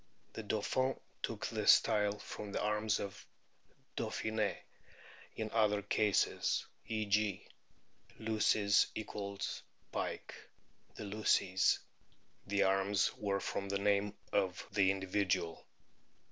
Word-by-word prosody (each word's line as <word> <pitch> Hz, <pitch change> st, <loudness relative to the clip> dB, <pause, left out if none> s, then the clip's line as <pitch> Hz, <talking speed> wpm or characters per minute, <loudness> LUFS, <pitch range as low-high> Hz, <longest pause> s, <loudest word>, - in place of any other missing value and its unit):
The -, -, -5 dB
Dauphin 110 Hz, +5 st, 0 dB, 0.2 s
took -, -, -3 dB
his -, -, 0 dB
style 105 Hz, -1 st, +5 dB
from 105 Hz, 0 st, -7 dB
the -, -, -1 dB
arms 105 Hz, 0 st, +1 dB
of 100 Hz, 0 st, -6 dB, 0.7 s
Dauphine*; 110 Hz, -1 st, -1 dB, 0.8 s
in 110 Hz, -1 st, -3 dB
other 105 Hz, -2 st, +2 dB
cases 105 Hz, 0 st, +1 dB, 0.2 s
(e.g., 105 Hz, -3 st, 0 dB, 0.7 s
Luces 110 Hz, -2 st, +3 dB, 0.5 s
= 100 Hz, -, -7 dB
pike, -, -, -3 dB, 0.6 s
the -, -, -6 dB
Luceys) 100 Hz, -2 st, +2 dB, 0.7 s
the 100 Hz, 0 st, +2 dB
arms 95 Hz, +1 st, +2 dB
were 100 Hz, -1 st, -1 dB
from 100 Hz, 0 st, -3 dB
the 100 Hz, -, +1 dB
name 100 Hz, 0 st, +1 dB, 0.2 s
of 95 Hz, -2 st, 0 dB
the 100 Hz, -1 st, +4 dB
individual. 95 Hz, -3 st, -1 dB
100 Hz, 105 wpm, -35 LUFS, 100-105 Hz, 0.8 s, style